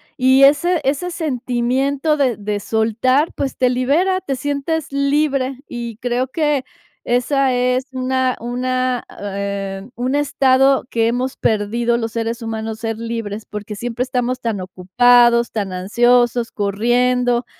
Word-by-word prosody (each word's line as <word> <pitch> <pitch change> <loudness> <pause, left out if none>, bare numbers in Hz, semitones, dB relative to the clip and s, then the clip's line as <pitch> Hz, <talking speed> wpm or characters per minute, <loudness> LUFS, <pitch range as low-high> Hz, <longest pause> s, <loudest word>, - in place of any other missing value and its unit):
y 260 +1 +4
ese 320 +5 +4
ese 285 +6 -1
sentimiento 270 -1 -1
de 260 -5 +1
de 205 0 -3
soltar, 230 +8 +1
pues, 275 -1 -3
te 255 - +3
libera, 305 +10 +1
te 275 -7 -3
sientes 285 +3 -2
libre. 275 -2 0
Y 235 -2 -6
creo 245 +1 -1
que 295 -1 0 0.4
esa 260 +2 +1
es 250 +1 +1
una 260 0 0
una, 255 +1 -1 0.2
eh, 200 0 -4
un 255 +3 -1
estado 270 -2 +3
que 225 -1 +1
hemos 250 +3 -2
perdido 235 +2 0
los 225 -1 -3
seres 230 +1 -3
humanos: 220 -1 -4
ser 225 -1 -3
libres, 225 -2 -5
porque 210 0 -7
siempre 240 +3 -3
estamos 250 -1 -2
tan 220 -5 -2
ocupados, 235 +6 +3
tan 200 -4 -3
ansiosos, 240 +5 +2
corriendo, 240 +4 +1
245 Hz, 135 wpm, -19 LUFS, 225-270 Hz, 0.4 s, y